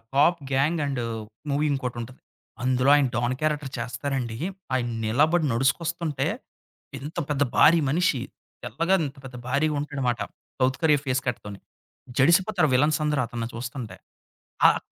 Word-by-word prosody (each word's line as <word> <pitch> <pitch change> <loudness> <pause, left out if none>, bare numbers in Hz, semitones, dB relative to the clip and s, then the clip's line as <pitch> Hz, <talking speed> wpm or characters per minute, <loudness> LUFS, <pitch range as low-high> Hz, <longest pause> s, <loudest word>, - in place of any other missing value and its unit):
Pop 165 +5 +4
gang 145 +5 +2
and, 140 -3 -2 0.5
movie 145 +2 +1
ఇంకోటి 125 -3 -3
ఉంటది. 120 +2 -9 0.4
అందులో 130 +1 +3
ఆయన 145 -2 +4
డాన్ 120 +1 +1
క్యారెక్టర్ 150 -3 -1
చేస్తారండి. 120 0 -3 0.4
ఆయన 120 -2 0 0.2
నిలబడి 155 +9 +3
నడుచుకొస్తుంటే, 150 +3 0 0.7
ఇంత 145 +4 -8
పెద్ద 145 -1 +1
భారీ 165 +2 +7
మనిషి, 165 -4 +2 0.4
తెల్లగా 165 - +1
ఇంత 140 - -9
పెద్ద 125 -1 -8
భారీగా 150 +3 +1
ఉంటాడు 145 0 -6
అన్నమాట, 125 -3 0 0.4
సౌత్ 130 0 +2
కొరియా 150 -3 +4
ఫేస్ 130 0 0
కట్‌తోని. 105 -5 -5 0.6
జడిసిపోతారు 170 +3 +4
విలన్స్ 150 +4 +3
అందరూ 150 -2 +1
అతని 115 -1 -4
చూస్తుంటే. 120 0 -6 0.7
ఆహ్, - - +3
135 Hz, 135 wpm, -25 LUFS, 125-155 Hz, 0.7 s, భారీ